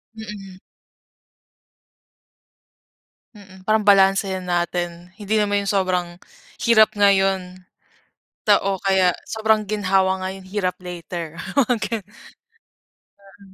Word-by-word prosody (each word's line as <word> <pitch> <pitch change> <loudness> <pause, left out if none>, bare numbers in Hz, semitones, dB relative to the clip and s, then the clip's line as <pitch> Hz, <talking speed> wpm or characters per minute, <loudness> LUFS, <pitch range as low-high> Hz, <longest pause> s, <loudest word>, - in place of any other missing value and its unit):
Mm. 200 -4 -9 2.8
Mm, 190 -2 -15
parang 215 +1 +2
balansehin 195 -1 +4
natin. 175 0 -3
Hindi 210 +1 -2
naman 205 -1 +1
yung - - -1
sobrang, 180 -3 -1 0.5
hirap 220 -2 +6
ngayon, 190 -2 +2 0.8
ta - - +5
o 195 -1 -1
kaya, 190 -2 +3
sobrang 220 -1 +1
ginhawa 190 -2 +1
ngayon, 190 0 -6
hirap 185 -2 -2
later, 170 -2 -7 0.2
mga 250 -3 +2
gano'n. 220 0 -3 1.4
Mm, 195 -1 -17
195 Hz, 100 wpm, -21 LUFS, 185-210 Hz, 2.8 s, hirap